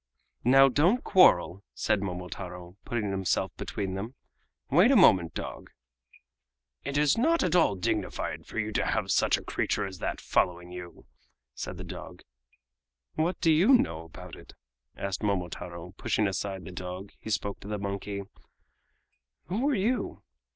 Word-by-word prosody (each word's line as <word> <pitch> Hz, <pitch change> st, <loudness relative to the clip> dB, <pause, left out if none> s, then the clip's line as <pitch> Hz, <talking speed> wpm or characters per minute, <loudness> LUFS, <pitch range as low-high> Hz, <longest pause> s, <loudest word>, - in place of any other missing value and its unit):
"Now, 135 Hz, +3 st, +7 dB
don't 170 Hz, -, +3 dB
quarrel!" 100 Hz, -, +4 dB
said 100 Hz, -, +1 dB
Momotaro, 90 Hz, -1 st, -6 dB
putting 110 Hz, -5 st, -2 dB
himself 95 Hz, -1 st, -1 dB
between 95 Hz, -2 st, -4 dB
them. 110 Hz, +7 st, -5 dB, 0.6 s
"Wait 175 Hz, -, +6 dB
a 275 Hz, -, +5 dB
moment, 95 Hz, -, +5 dB
dog!" -, -, -6 dB, 1.1 s
"It 140 Hz, 0 st, -3 dB
is 150 Hz, +6 st, +3 dB
not 330 Hz, +7 st, +3 dB
at 180 Hz, -1 st, +1 dB
all 165 Hz, -, +4 dB
dignified 90 Hz, -, -2 dB
for -, -, -9 dB
you 110 Hz, 0 st, -1 dB
to -, -, 0 dB
have 100 Hz, -4 st, 0 dB
such -, -, +3 dB
a -, -, -9 dB
creature -, -, -1 dB
as 95 Hz, -2 st, -8 dB
that -, -, -3 dB
following 90 Hz, 0 st, 0 dB
you!" 90 Hz, -1 st, -9 dB, 0.5 s
said -, -, -6 dB
the -, -, -6 dB
dog. -, -, -9 dB, 0.9 s
"What 165 Hz, +4 st, -1 dB
do 165 Hz, -, +4 dB
you 185 Hz, -, +6 dB
know 80 Hz, -, -2 dB
about 80 Hz, -, -11 dB
it?" -, -, -14 dB, 0.4 s
asked 100 Hz, -2 st, -3 dB
Momotaro; 90 Hz, -4 st, -3 dB
and 90 Hz, +1 st, -15 dB
pushing 105 Hz, -, +1 dB
aside 95 Hz, 0 st, -3 dB
the 95 Hz, -, -8 dB
dog, 90 Hz, +2 st, -7 dB
he -, -, -8 dB
spoke 100 Hz, -2 st, -2 dB
to -, -, -11 dB
the 105 Hz, 0 st, -2 dB
monkey: 100 Hz, 0 st, -4 dB, 1.3 s
"Who 235 Hz, +10 st, +1 dB
are 280 Hz, -, +2 dB
you?" 230 Hz, +5 st, -1 dB
100 Hz, 160 wpm, -28 LUFS, 90-150 Hz, 1.3 s, Now